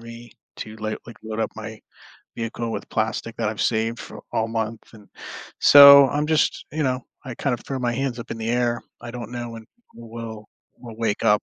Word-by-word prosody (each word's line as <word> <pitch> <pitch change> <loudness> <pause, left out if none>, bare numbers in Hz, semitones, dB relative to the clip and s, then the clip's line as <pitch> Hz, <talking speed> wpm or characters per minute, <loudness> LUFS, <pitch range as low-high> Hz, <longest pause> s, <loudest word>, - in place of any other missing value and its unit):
me 115 0 -11 0.2
to, 110 0 -8
like 110 0 -3
like, 115 - -11
load 110 0 -5
up - - -1
my - - -8 0.6
vehicle 115 0 -4
with - - -6
plastic - - -2
that - - -1
I've - - -4
saved 115 +1 0
for - - -10
all 110 0 0
month, 115 0 -3
and 105 -2 -15 0.5
so 140 -1 +10
I'm 145 +3 -1
just, 155 0 +1
you 155 +1 -1
know, 130 -2 0 0.3
I 130 - -5
kind 135 +1 -1
of 120 - -7
throw 135 -1 -3
my 120 -1 -1
hands 130 -1 -2
up 120 - -8
in 115 - -5
the 110 - -4
air, 120 -1 0 0.2
I 120 - -7
don't 120 -1 -7
know 120 -1 -5
when 115 -1 -9 0.3
we 115 - -12
will 110 -2 -8 0.3
we'll 115 -3 -11
wake 110 -2 -1
up. 105 0 +4
115 Hz, 215 wpm, -23 LUFS, 110-125 Hz, 0.6 s, so